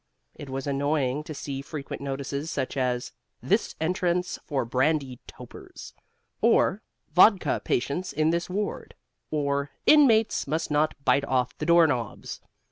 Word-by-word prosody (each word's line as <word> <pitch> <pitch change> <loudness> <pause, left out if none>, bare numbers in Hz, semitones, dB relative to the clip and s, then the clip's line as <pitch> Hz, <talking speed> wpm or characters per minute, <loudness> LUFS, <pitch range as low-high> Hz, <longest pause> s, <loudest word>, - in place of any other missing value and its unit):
It 145 - -10
was 135 0 -4
annoying 145 0 0
to 155 - -6
see 140 -1 -5
frequent 140 0 -7
notices 140 +2 -4
such 130 - -3
as: 125 -2 -1 0.3
This - - 0
Entrance 180 +2 -1
for 135 -6 -2
Brandy 130 +1 0
Topers; - - -12 0.5
or 200 - +3 0.3
Vodka 190 +3 +5
Patients 145 +9 -1
in 155 +2 +1
This 170 +1 -2
Ward; 205 +3 -4 0.3
or 140 -2 -1 0.2
Inmates 230 - +4
Must 155 +2 -2
Not 150 +1 +1
Bite 140 - +3
Off 130 -2 0
the 150 - -3
Door 170 0 +6
Knobs. 120 -7 -3
145 Hz, 135 wpm, -26 LUFS, 135-170 Hz, 0.5 s, Door